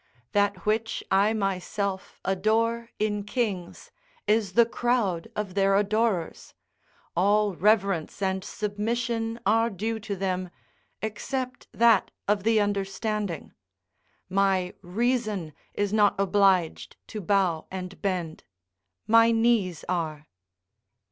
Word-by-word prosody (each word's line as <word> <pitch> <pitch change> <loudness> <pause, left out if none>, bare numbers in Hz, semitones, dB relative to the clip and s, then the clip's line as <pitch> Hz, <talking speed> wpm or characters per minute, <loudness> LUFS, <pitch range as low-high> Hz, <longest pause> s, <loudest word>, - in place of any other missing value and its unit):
That 205 0 +1
which 220 +1 0
I 200 +3 +4
myself 195 -1 -2
adore 225 +5 +1
in 210 -1 -1
kings 205 -6 -3 0.3
is 210 -3 +1
the 235 +3 +6
crowd 230 -7 0
of 205 -3 -3
their 195 0 +3
adorers; 205 -3 0 0.6
all 205 +3 +3
reverence 195 -3 +1
and 190 -1 -1
submission 225 +3 -2
are 225 +3 +3
due 220 +3 -3
to 205 -2 -4
them, 185 -1 -2 0.5
except 255 +4 -4
that 230 -3 +4 0.2
of 205 0 +2
the 220 +2 +3
understanding: 205 -1 -2 0.7
my 190 -1 +1
reason 215 - -1 0.2
is 205 0 -1
not 210 -1 +4
obliged 195 -3 +2
to 215 - -5
bow 185 -4 +1
and 185 0 -7
bend; 180 -5 -2 0.6
my 230 +1 +6
knees 225 -7 +2
are. 160 -4 -2
205 Hz, 110 wpm, -26 LUFS, 190-225 Hz, 0.7 s, the